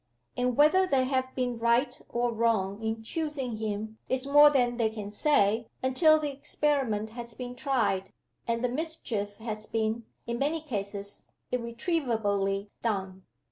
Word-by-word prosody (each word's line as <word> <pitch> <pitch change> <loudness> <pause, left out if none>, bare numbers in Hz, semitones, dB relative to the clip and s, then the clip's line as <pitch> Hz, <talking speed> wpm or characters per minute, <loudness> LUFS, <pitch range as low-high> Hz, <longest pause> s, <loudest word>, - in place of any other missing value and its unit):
And 250 -1 0
whether 370 +6 +5
they 270 -6 +3
have 260 0 -1
been 245 -2 -1
right 235 +4 +2
or 240 0 0
wrong 220 -3 +1
in 225 0 -2
choosing 275 -4 -3
him 220 0 -4
is 260 0 0
more 290 +1 +8
than 245 -4 +2
they 230 -2 +2
can 210 -2 -6
say, 225 -3 +3 0.2
until 310 +5 +5
the 300 -2 -2
experiment 270 -6 -1
has 235 0 -7
been 250 -1 -6
tried, 235 -8 0 0.4
and 230 +1 0
the 250 - +2
mischief 240 -8 -3
has 215 -1 -5
been, 225 +1 -1 0.2
in 235 0 -3
many 300 +4 +1
cases, 200 -7 -5 0.2
irretrievably 225 - -1
done. 190 -4 -3
235 Hz, 145 wpm, -29 LUFS, 215-270 Hz, 0.4 s, more